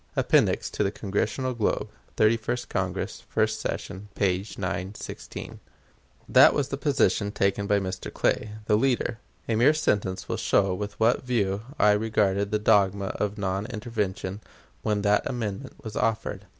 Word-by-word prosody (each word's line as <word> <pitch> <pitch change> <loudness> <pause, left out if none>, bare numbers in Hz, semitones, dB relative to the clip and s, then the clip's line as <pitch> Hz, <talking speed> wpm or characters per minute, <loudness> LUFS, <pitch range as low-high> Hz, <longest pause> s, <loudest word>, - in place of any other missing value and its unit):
(Appendix - - +2
to 100 - 0
Congressional 110 +6 -2
Globe, 115 -3 0 0.3
Thirty 110 +1 +5
first 120 +2 -3
Congress, - - -2
first - - +1
session, 95 +3 -4
p. 95 -2 +1
916.) 95 +1 -5 0.7
That - - +7
was 140 -2 0
the 140 - -3
position 115 - +1
taken 100 0 0
by 100 0 +3
Mr. 95 -1 -5
Clay, 105 - 0
the 105 -1 +3
leader. 120 -1 0 0.3
A 115 - 0
mere 125 +8 +5
sentence 100 -11 0
will - - -2
show 95 -2 +2
with 105 +2 -5
what 115 +2 +3
view 105 -6 0 0.2
I 105 - +5
regarded 105 -2 +1
the 105 - +1
dogma 100 -2 +3
of 105 +1 -1
non 100 +1 -2
intervention 105 -4 -3 0.4
when 105 -1 0
that 105 0 +3
amendment 120 +1 -4
was 110 -3 -7
offered. 110 -4 -1
105 Hz, 150 wpm, -26 LUFS, 100-115 Hz, 0.7 s, That